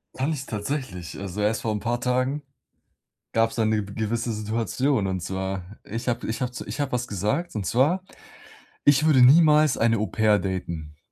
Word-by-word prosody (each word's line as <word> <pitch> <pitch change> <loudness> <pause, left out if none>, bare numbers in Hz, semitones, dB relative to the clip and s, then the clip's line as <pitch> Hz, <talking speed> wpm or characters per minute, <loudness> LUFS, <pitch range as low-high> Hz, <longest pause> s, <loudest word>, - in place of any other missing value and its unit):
Kann 135 +5 -1
ich 140 -3 -4
tatsächlich. 105 - -4
Also 100 +1 -4
erst 105 +2 +1
vor 110 - 0
'n 105 - -2
paar 120 +3 -1
Tagen 130 +4 0 0.9
gab's 115 0 +1
da 110 -2 +1
'ne 110 0 +2
w 100 - -9
gewisse 115 +2 -2
Situation, 110 +2 0
und 95 -1 -1
zwar, 95 0 -3 0.2
ich 115 +4 -6
habe 120 -1 -1
ich 115 +4 -3
habe 125 -1 -1
zu 125 - -7
ich - - -6
habe 140 -1 -1
was 125 0 -1
gesagt, 105 - -2
und 105 -4 -3
zwar: 150 - +2 0.8
„Ich 145 +1 +5
würde 140 -5 +5
niemals 150 +1 +6
eine 115 0 +3
Au-pair 105 0 +2
daten." 85 -5 -4
115 Hz, 185 wpm, -25 LUFS, 105-130 Hz, 0.9 s, niemals